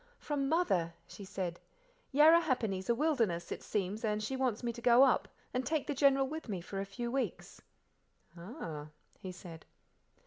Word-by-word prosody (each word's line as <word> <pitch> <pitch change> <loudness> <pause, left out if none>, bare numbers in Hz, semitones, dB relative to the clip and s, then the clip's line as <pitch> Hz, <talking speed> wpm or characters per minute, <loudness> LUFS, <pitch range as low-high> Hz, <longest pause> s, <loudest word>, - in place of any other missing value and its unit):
"From 280 -2 -2
Mother," 190 - +1
she 200 - -11
said. 185 -3 -4 0.5
"Yarrahappini's 270 - +4
a 235 - +4
wilderness, 230 - 0
it - - -4
seems, 205 +2 -2
and 215 -1 0
she 265 +5 -2
wants 255 -4 -1
me 235 -1 -1
to 235 - -9
go 245 +1 +7
up, 270 - +3 0.3
and 255 - 0
take 300 +3 -1
the 290 - -2
General 275 -1 +4
with 310 -2 -6
me, 195 -3 -2
for 195 +3 -6
a 195 - -2
few 235 +4 -4
weeks." 270 +1 -3 0.7
"Ah!" 170 - -7 0.3
he 185 - -6
said. 175 -3 -11
235 Hz, 170 wpm, -33 LUFS, 190-275 Hz, 0.7 s, go